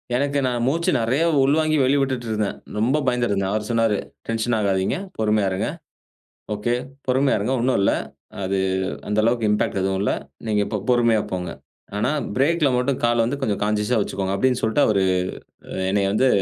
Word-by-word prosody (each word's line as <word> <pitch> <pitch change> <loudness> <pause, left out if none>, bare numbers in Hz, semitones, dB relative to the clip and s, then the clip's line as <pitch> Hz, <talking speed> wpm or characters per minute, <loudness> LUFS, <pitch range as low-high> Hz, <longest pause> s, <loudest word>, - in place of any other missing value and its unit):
எனக்கு 140 +2 +1
நான் 120 -2 0
மூச்சு 165 +6 +1
நிறைய 120 +5 +1 0.2
உள்வாங்கி 155 +2 +2
வெளிவிட்டுட்டு 130 -2 +1
இருந்தேன். 105 -2 -1 0.2
ரொம்ப 125 +7 +2
பயந்திட்டுருந்தேன். 105 -6 +1
அவர் 105 0 -1
சொன்னாரு, 115 -3 +2 0.3
டென்ஷன் 115 +1 0
ஆகாதீங்க, 95 -2 +1 0.2
பொறுமையா 105 -2 +2
இருங்க. 95 +2 -1 0.8
ஒகே 105 +3 -1 0.3
பொறுமையா 130 +2 +3
இருங்க, 110 +6 -1
ஒண்ணும் 125 +2 +2
இல்லை. 100 - +3 0.5
அது 95 +1 0 0.5
அந்த 105 +1 -1
அளவுக்கு 115 -1 +2
இம்பாக்ட் 105 -1 0
எதுவும் 95 0 0
இல்லை. 105 - +1 0.3
நீங்க 105 -1 +2
இப்போ 105 - -2
பொறுமையா 115 -3 +4
போங்க. 90 -2 -3 0.5
ஆனா, 120 +7 +1 0.2
பிரேக்ல 150 +3 +3
மட்டும் 125 +1 0
காலை 120 0 +2
வந்து 140 +4 -2
கொஞ்சம் 105 -5 -1
கான்ஷியஸா 105 +3 +1
வைச்சுக்கோங்க 95 -1 -2
அப்படினு 125 +4 +1
சொல்லிட்டு 110 +6 +2
அவரு, 100 -3 +2 0.7
அ - - -10 0.2
என்னைய 100 0 +1
வந்து 130 +5 +3
115 Hz, 160 wpm, -22 LUFS, 105-130 Hz, 0.8 s, பொறுமையா